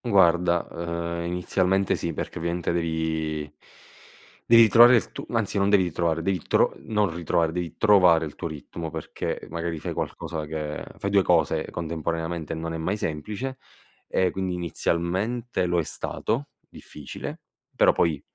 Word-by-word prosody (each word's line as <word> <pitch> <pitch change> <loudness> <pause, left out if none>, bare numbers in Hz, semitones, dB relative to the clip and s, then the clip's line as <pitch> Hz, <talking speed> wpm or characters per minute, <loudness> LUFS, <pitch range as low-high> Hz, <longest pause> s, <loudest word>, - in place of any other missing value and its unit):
Guarda, 85 -5 +3
ehm, 85 0 -3
inizialmente 90 +2 +1
sì 85 - -3
perché 75 - -5
ovviamente 85 +1 -1
devi 80 -2 -1 1.1
devi 115 0 +8
ritrovare 120 +3 +8
il 115 - 0
tu - - -7
anzi 110 -4 0
non 100 0 +2
devi 100 -2 +5
ritrovare, 85 -1 -1
devi 95 -1 0
tro - - +3
non 105 -5 0
ritrovare, 85 -1 0
devi 85 0 -4
trovare 90 -7 +5
il 75 - -7
tuo - - -5
ritmo 80 +2 -7
perché 80 0 -5
magari 85 0 -3
fai - - -4
qualcosa 80 -2 -4
che 75 -1 -4
fai 100 - -3
2 100 -1 +5
cose 85 -5 +2
contemporaneamente 80 0 -3
non 80 +1 -4
è - - -3
mai 90 +6 -1
semplice 105 - -4 0.5
e 90 -1 +1
quindi 95 -1 -2
inizialmente 90 +6 -1
lo 90 0 +1
è - - +1
stato, 125 - -2 0.2
difficile, 75 -2 -8 0.3
però - - +5
poi 80 -4 +1
85 Hz, 150 wpm, -25 LUFS, 80-95 Hz, 1.1 s, devi